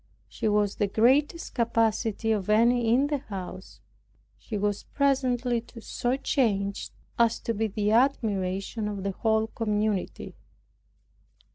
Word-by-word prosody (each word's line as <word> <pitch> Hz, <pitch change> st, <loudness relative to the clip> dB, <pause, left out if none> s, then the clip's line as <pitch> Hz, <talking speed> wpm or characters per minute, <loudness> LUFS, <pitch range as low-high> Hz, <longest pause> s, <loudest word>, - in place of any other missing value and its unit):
She -, -, -3 dB
has 210 Hz, -1 st, +1 dB
the 205 Hz, -, +1 dB
greatest 265 Hz, -, +2 dB
capacity 225 Hz, -2 st, +1 dB
of 210 Hz, -3 st, -1 dB
any 230 Hz, +2 st, +4 dB
in 260 Hz, +4 st, +4 dB
the 290 Hz, -1 st, -1 dB
house. 190 Hz, -6 st, -8 dB, 0.5 s
She 215 Hz, -, -6 dB
was 205 Hz, 0 st, -1 dB
presently 255 Hz, -4 st, +1 dB, 0.2 s
so 245 Hz, +2 st, -2 dB
changed 200 Hz, -8 st, 0 dB, 0.3 s
as 230 Hz, -1 st, +4 dB
to 230 Hz, -, -2 dB
be 220 Hz, +1 st, 0 dB
the 210 Hz, 0 st, -1 dB
admiration 215 Hz, -4 st, 0 dB
of 200 Hz, -2 st, -4 dB
the 200 Hz, -, -1 dB
whole 220 Hz, +2 st, +1 dB
community. 210 Hz, -3 st, -2 dB
220 Hz, 125 wpm, -27 LUFS, 205-245 Hz, 0.5 s, any